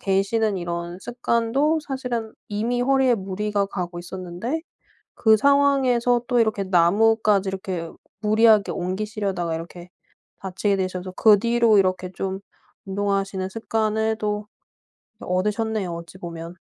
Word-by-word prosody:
계시는 200 +2 +1
이런 175 0 -4
습관도 240 +6 0
사실은 250 -6 -4 0.2
이미 230 +4 -1
허리에 265 -1 +3
무리가 200 0 -2
가고 175 -3 -5
있었는데 185 - -5 0.5
그 220 -2 +4
상황에서 260 -3 +3
또 245 -1 +2
이렇게 220 -3 +1
나무까지 200 +3 +3
이렇게 185 -3 -4 0.3
무리하게 215 -1 +4
옮기시려다가 190 -2 -2
이렇게 175 +2 -8 0.5
다치게 195 +2 -1
되셔서 185 -1 -3
그 215 -3 +6
뒤로 235 -1 +3
이렇게 185 -1 +1
좀 190 +1 -4 0.5
운동하시는 195 -1 -1
습관을 220 0 -1
또 210 0 -2 0.7
얻으셨네요, 210 +1 -1
어찌 170 +2 -9
보면. 170 -1 -8
205 Hz, 305 characters per minute, -23 LUFS, 185-225 Hz, 0.7 s, 그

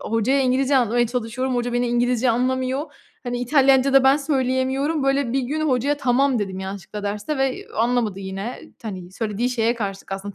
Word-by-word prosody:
hocaya 230 +5 +1
İngilizce 265 +2 +2
anlatmaya 240 -1 +2
çalışıyorum, 250 +2 -2
hoca 245 0 -1
beni 245 0 +1
İngilizce 245 0 +2
anlamıyor, 260 +4 -1 0.3
hani, 245 0 -2
İtalyanca 270 +1 +3
da 270 -1 +6
ben 270 +2 +6
söyleyemiyorum, 270 +1 0
böyle, 275 -3 +1
bir 270 - +1
gün 290 +5 -3
hocaya 270 +3 +1
"Tamam." 265 -1 +2
dedim 190 -2 -3
yanlışlıkla 195 +2 -6
derste 210 +8 -3
ve, 270 -1 +1
eee, - - -11
anlamadı 225 -4 0
yine, 195 +5 -5 0.2
t 225 - -7
hani, 185 -2 -8
söylediği 225 +3 -2
şeye 235 -1 +1
karşılık 195 -3 -5
aslında 195 +1 -5
245 Hz, 180 wpm, -22 LUFS, 225-265 Hz, 0.3 s, da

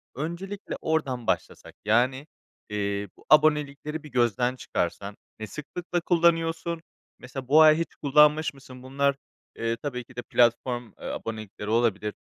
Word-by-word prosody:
Öncelikle 170 +8 -5
oradan 135 -7 -1
başlasak, - - -2
yani, 130 +6 +2 0.4
eee, 100 -1 -2
bu - - -21
abonelikleri 150 0 +3
bir 150 - -10
gözden 120 +1 +1
çıkarsan 100 -2 -3 0.2
ne 110 - -5
sıklıkla 175 +4 -4
kullanıyorsun? 165 -1 +1 0.4
Mesela, 130 0 -8
bu 155 +3 +7
ay 155 0 +7
hiç 165 - -4
kullanmış 150 +2 +4
mısın? 130 -2 -13
Bunlar, 140 +1 +1 0.4
eee, 115 0 -2
tabii 125 -1 -4
ki 125 +1 -19
de 120 - -4
platform, 120 0 +1
eee, - - -10
abonelikleri 110 -2 -5
olabilir 110 -2 +1
135 Hz, 135 wpm, -26 LUFS, 115-155 Hz, 0.4 s, bu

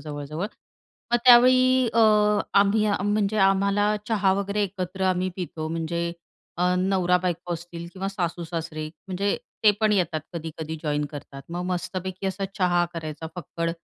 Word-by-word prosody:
जवळ-जवळ. 150 +4 -5 0.7
मग - - +6
त्यावेळी 255 0 +6
अ, 230 - +4 0.6
आम्ही 205 +2 +3
आ 205 - +2
म्हणजे 205 +1 +1
आम्हाला 200 +2 +3
चहा 205 -4 +3
वगैरे 200 +1 -1
एकत्र 190 -1 -4
आम्ही 185 0 +1
पितो. 160 -3 -4
म्हणजे 170 +1 -2 0.4
अ, 180 +1 +2
नवरा-बायको 180 -2 +1
असतील 170 0 -8
किंवा 190 +1 -3
सासूसासरे 165 -4 -4 0.2
म्हणजे 195 +2 0 0.3
ते 210 - +9
पण 215 -1 +3
येतात 170 -5 +1
कधी-कधी 160 -1 -5
जॉइन 150 -1 0
करतात. 140 -2 -9
मग 175 +1 -4
मस्तपैकी 185 +1 -3
असा 190 +1 -2
चहा 175 -2 +3
करायचा 160 -1 -5
फक्कड 165 -1 -3
180 Hz, 140 wpm, -25 LUFS, 165-200 Hz, 0.7 s, ते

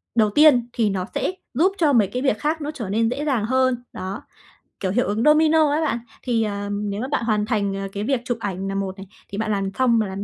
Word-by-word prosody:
đầu 220 -2 +4
tiên 255 0 +5
thì 225 -3 +1
nó 190 -2 -2
sẽ - - 0 0.2
giúp 335 +10 +3
cho 310 -6 +3
mấy 220 -6 +4
cái 250 +6 -4
việc 260 -6 +1
khác 310 +2 -1
nó 295 +1 -3
trở 240 -10 -6
nên 225 +3 +1
dễ 280 +5 -3
dàng 255 -8 +1
hơn. 255 0 +1
Đó, 190 +2 -5 0.6
kiểu, 190 - -1
hiệu 245 +5 +1
ứng 210 +3 0
domino 310 0 +5
á 300 +2 +1
bạn. 300 -7 0 0.2
Thì, 235 -3 +1
à, 205 -1 -3
nếu 205 0 -3
mà 255 - -3
bạn 275 -3 -1
hoàn 210 -2 +1
thành, 205 -3 0
ờ, 195 0 -4
cái 205 - -3
việc 260 +1 0
chụp 245 -3 -1
ảnh 195 -1 -3
nà 195 - -3
một 195 -1 -3
này, 195 0 -10 0.2
thì 200 - -6
bạn 215 0 -1
làm 195 -1 -1
xong 240 -3 +4
mà 215 - 0
làm 195 +1 -5
225 Hz, 265 wpm, -22 LUFS, 200-265 Hz, 0.6 s, tiên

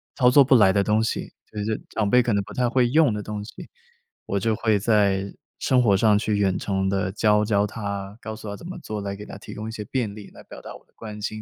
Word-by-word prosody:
操 125 -3 +4
作 140 +2 +7
不 130 0 +4
来 100 -5 +6
的 100 -1 +2
东 110 +2 +2
西， - - -3 0.2
就 105 - -6
就 105 - -2
是 - - -5
长 105 -2 -1
辈 125 0 +5
可 115 - 0
能 100 - +2
不 - - -11
太 125 -1 +1
会 125 -1 +3
用 150 -5 +4
的 105 -1 -4
东 105 -1 -5
西， - - -11 0.6
我 100 - -2
就 110 +2 0
会 110 -2 +2
在 100 -2 +1 0.3
生 125 -1 +3
活 100 -4 +4
上 105 0 +4
去 105 -1 -1
远 95 -2 +1
程 95 -1 -1
地 95 -1 -1
教 105 0 +3
教 105 -1 +2
她， 100 -1 -5
告 110 0 -6
诉 110 -1 -10
她 100 - -5
怎 170 - -10
么 185 - -7
做， 110 -8 -5
来 100 0 -4
给 105 - -9
她 - - -9
提 - - -10
供 110 +1 -6
一 - - -6
些 110 -2 -6
便 115 -5 -2
利 105 -2 -11
来 - - -14
表 - - -12
达 - - -9
我 - - -16
的 - - -37
关 105 -2 -8
心， 110 +1 -4
105 Hz, 300 characters per minute, -24 LUFS, 100-115 Hz, 0.6 s, 作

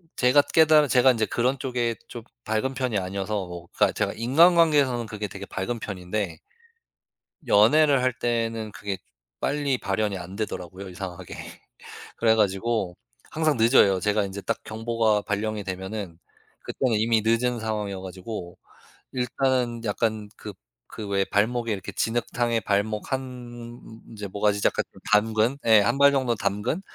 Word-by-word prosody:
제가 125 +3 +5
깨달은 155 -1 +4
제가 130 0 +5
인제 115 -3 0
그런 125 +4 0
쪽에 120 -3 -1
좀 120 - -8 0.2
밝은 110 +5 -1
편이 125 -5 -1
아니어서 100 +1 -2
뭐 85 -1 -9
그니까 - - +3
제가 - - -1
인간관계에서는 145 -1 +4
그게 105 -1 -5
되게 100 0 -8
밝은 115 +5 -4
편인데 95 -3 -4 1.1
연애를 135 +6 +5
할 130 - +2
때는 115 -2 -2
그게 100 -1 -5 0.4
빨리 140 -2 0
발현이 100 0 -1
안 90 +1 -8
되더라고요 95 -2 -5
이상하게. 90 -1 -7 0.8
그래 110 -1 +4
가지고 105 -2 0 0.4
항상 155 -3 +1
늦어요. 110 -5 +5
제가 105 +1 +1
인제 100 +1 -6
딱 - - -2
경보가 110 -1 0
발령이 105 0 -2
되면은 95 -2 -6 0.4
그때는 125 -5 0
이미 110 0 +2
늦은 120 +2 +1
상황이어 105 -3 -3
가지고 95 -1 -7 0.6
일단은 125 -1 0
약간 110 0 -1
그 - - -8 0.4
그 105 - -7
왜 100 -1 +1
발목에 115 +3 0
이렇게 95 -2 -5
진흙탕에 120 0 0
발목 105 +4 -1
한 120 -2 -6 0.3
이제 105 -1 -6
목까지 100 +1 0
이제 - - +3 0.4
담근 110 +4 +3
예 110 -2 +7
1 120 +6 +1
발 140 0 +6
정도 130 -3 +1
담근 105 - -2
110 Hz, 315 characters per minute, -25 LUFS, 100-125 Hz, 1.1 s, 예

